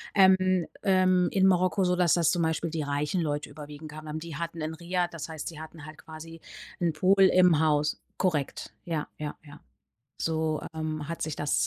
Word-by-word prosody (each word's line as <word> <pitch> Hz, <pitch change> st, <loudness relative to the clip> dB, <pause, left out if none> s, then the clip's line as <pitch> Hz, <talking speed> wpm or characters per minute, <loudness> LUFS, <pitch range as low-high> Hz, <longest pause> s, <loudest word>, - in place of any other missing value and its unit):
ähm, 185 Hz, -2 st, +4 dB, 0.2 s
ähm, 185 Hz, -1 st, +3 dB
in 190 Hz, -1 st, +4 dB
Marokko 185 Hz, +1 st, +3 dB
so, 180 Hz, 0 st, +2 dB
dass 180 Hz, -2 st, +3 dB
das 165 Hz, -2 st, +3 dB
zum 175 Hz, -, +1 dB
Beispiel 160 Hz, 0 st, 0 dB
die 160 Hz, -2 st, -2 dB
reichen 145 Hz, +5 st, -1 dB
Leute 145 Hz, -2 st, -2 dB
überwiegend 150 Hz, +1 st, -9 dB
kamen 155 Hz, +1 st, -9 dB
dann. 155 Hz, +1 st, -4 dB
Die 165 Hz, -2 st, -7 dB
hatten 165 Hz, 0 st, -5 dB
'n 155 Hz, +1 st, -3 dB
Riad, 175 Hz, +1 st, -2 dB
das 160 Hz, -1 st, -6 dB
heißt, 160 Hz, -2 st, -6 dB
sie 160 Hz, -2 st, -7 dB
hatten 160 Hz, -1 st, -10 dB
halt 155 Hz, 0 st, -11 dB
quasi 165 Hz, +1 st, -11 dB, 0.4 s
'n 170 Hz, -2 st, +2 dB
Pool 190 Hz, +5 st, +3 dB
im 180 Hz, -4 st, +5 dB
Haus. 150 Hz, -1 st, +1 dB, 0.2 s
Korrekt, 160 Hz, -7 st, -1 dB
ja, 160 Hz, -3 st, -3 dB
ja, 150 Hz, -1 st, -5 dB
ja. 145 Hz, 0 st, -13 dB, 0.6 s
So, 160 Hz, -1 st, -1 dB
ähm, 155 Hz, -1 st, -4 dB
hat 165 Hz, -, -5 dB
sich 155 Hz, -1 st, -3 dB
das, 105 Hz, -11 st, +1 dB
160 Hz, 195 wpm, -28 LUFS, 150-180 Hz, 0.6 s, im